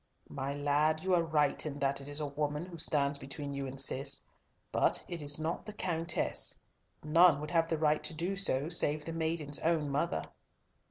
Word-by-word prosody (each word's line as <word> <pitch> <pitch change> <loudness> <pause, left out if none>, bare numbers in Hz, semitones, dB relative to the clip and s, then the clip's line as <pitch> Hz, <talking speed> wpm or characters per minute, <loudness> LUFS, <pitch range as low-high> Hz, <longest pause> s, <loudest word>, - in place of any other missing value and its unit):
"My 135 0 -4
lad, 145 +2 0
you 190 0 0
are 175 - +4
right 150 -3 0
in 145 -2 -5
that 140 0 -1
it 135 - -10
is 145 +1 -4
a 150 - -2
woman 150 +2 -3
who 175 -2 -11
stands 145 -3 +1
between 140 +1 -7
you 140 -1 -4
and 130 +1 -5
Cis, 135 +1 +5 0.5
but - - +1
it 170 -2 -6
is 145 +1 0
not 160 +2 -3
the 210 - -7
Countess. 170 -4 +2 0.4
None 165 0 +5
would 150 +1 -6
have 165 -1 +1
the 160 - -1
right 155 -1 +1
to - - -3
do 175 +5 -2
so, 150 -7 +1
save 155 -3 +1
the 165 - -5
maiden's 160 -3 -2
own 155 -3 0
mother." 80 - -1
150 Hz, 200 wpm, -31 LUFS, 140-165 Hz, 0.5 s, Cis